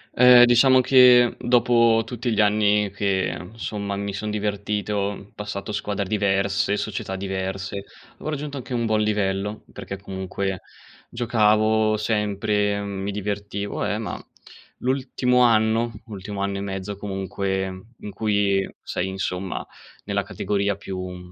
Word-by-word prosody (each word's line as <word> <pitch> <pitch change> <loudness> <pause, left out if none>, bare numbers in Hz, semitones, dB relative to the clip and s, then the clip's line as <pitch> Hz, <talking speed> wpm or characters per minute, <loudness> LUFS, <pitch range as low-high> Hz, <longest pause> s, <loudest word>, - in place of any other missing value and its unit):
Ehm, 125 0 +8
diciamo 130 +2 +5
che 125 -2 +6
dopo 120 -2 +4
tutti 120 0 -3
gli 110 - +3
anni 105 0 +3
che, 100 -2 -1 0.2
insomma, 100 -3 -4
mi 100 0 -3
son 105 +2 -4
divertito, 105 -1 -2
passato 105 0 -5
squadre 100 -1 -2
diverse, 100 0 +1
società 100 -2 -4
diverse, 95 +1 -4 0.3
avevo 155 - -6
raggiunto 145 -1 -4
anche 125 0 -6
un 115 -1 0
buon 110 0 +2
livello, 105 0 -1
perché 95 - -7
comunque 95 -1 -4 0.5
giocavo 110 -2 +2
sempre, 105 -1 0
mi 100 0 -4
divertivo, 100 0 -3
eh, - - -1
ma - - -5 0.6
l'ultimo 125 -1 +1
anno, 115 0 +3
l'ultimo 100 -1 -6
anno 100 0 -1
e - - -4
mezzo 95 0 -5
comunque, 95 -1 -2 0.3
in 105 - -7
cui, 100 -3 +1
sei, 90 - -3
insomma, 95 -1 -3 0.4
nella - - -1
categoria 100 -1 -1
più 90 -2 -7
105 Hz, 125 wpm, -23 LUFS, 100-110 Hz, 0.6 s, Ehm